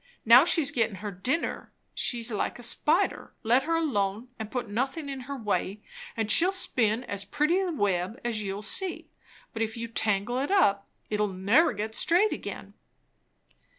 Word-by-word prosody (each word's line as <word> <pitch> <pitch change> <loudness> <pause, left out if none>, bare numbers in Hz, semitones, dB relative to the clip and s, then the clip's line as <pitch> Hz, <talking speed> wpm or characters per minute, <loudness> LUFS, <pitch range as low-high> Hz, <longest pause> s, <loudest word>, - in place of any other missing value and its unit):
Now 240 +6 +8
she's 320 -5 +2
gettin' 225 -4 0
her 205 - -3
dinner. 250 - -3 0.2
She's 235 -1 0
like 210 - -2
a 245 - -11
spider; 320 +10 +1
let 245 +4 +3
her 330 +1 0
alone, 230 -7 -1
and 220 -1 -5
put 245 -1 -3
nothin' 265 +8 -3
in 275 -1 -5
her 280 - -4
way, 210 -2 -2 0.3
and 220 -1 0
she'll 360 +3 +5
spin 245 - +1
as 200 -4 -5
pretty 300 - +1
a 375 -2 -1
web 200 - -1
as 220 -3 -1
you'll 200 +1 -4
see; 365 - -4 0.4
but 225 - -4
if 225 +1 -2
you 230 0 -4
tangle 220 +1 0
it 275 - -2
up, 200 - +2 0.2
it'll 210 0 +1
never 200 - +3
get 215 +2 -4
straight 360 - +3
again." - - -7
230 Hz, 170 wpm, -27 LUFS, 205-295 Hz, 0.4 s, Now